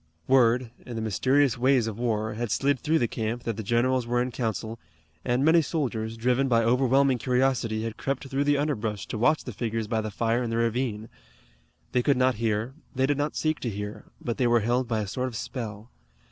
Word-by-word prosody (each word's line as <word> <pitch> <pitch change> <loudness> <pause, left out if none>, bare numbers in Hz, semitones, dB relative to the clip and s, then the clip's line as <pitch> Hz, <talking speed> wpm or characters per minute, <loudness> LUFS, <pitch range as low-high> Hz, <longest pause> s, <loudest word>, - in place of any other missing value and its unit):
Word, 125 -2 +3
in 120 - -7
the 115 - -3
mysterious 130 +4 +2
ways 130 -1 +3
of 110 0 -5
war, 110 -2 -1
had 115 +1 -3
slid 140 +5 +1
through 155 +5 +1
the 120 - +1
camp 115 +2 -3
that 115 - -2
the 110 - -4
generals 120 +3 +1
were 120 +1 +1
in 125 +1 -1
council, 115 -1 -3 0.4
and 125 +2 +1
many 165 +1 +6
soldiers, 115 -8 -2
driven 125 +3 +1
by 115 -2 +3
overwhelming 130 +2 +3
curiosity, 125 -3 +1
had 115 -1 -4
crept 135 0 -3
through 135 +1 -1
the 145 0 +3
underbrush 110 -8 -2
to 110 - -5
watch 155 +7 +3
the 125 - -7
figures 115 0 -2
by 110 +1 -1
the 110 - -4
fire 115 +3 0
in 120 - -2
the 115 - -1
ravine. 115 -2 -1 0.8
They 125 - +2
could 140 +1 +2
not 130 0 +3
hear, 110 +2 0 0.2
they 130 +1 +2
did 145 +1 0
not 145 +1 -1
seek 155 -1 0
to 120 - -3
hear, 105 0 -6
but 120 - -3
they 125 - +3
were 120 -1 +4
held 120 +3 0
by 110 -2 0
a 105 - -4
sort 125 +7 -2
of 125 - -7
spell. 110 -1 -6
120 Hz, 215 wpm, -26 LUFS, 110-130 Hz, 0.8 s, many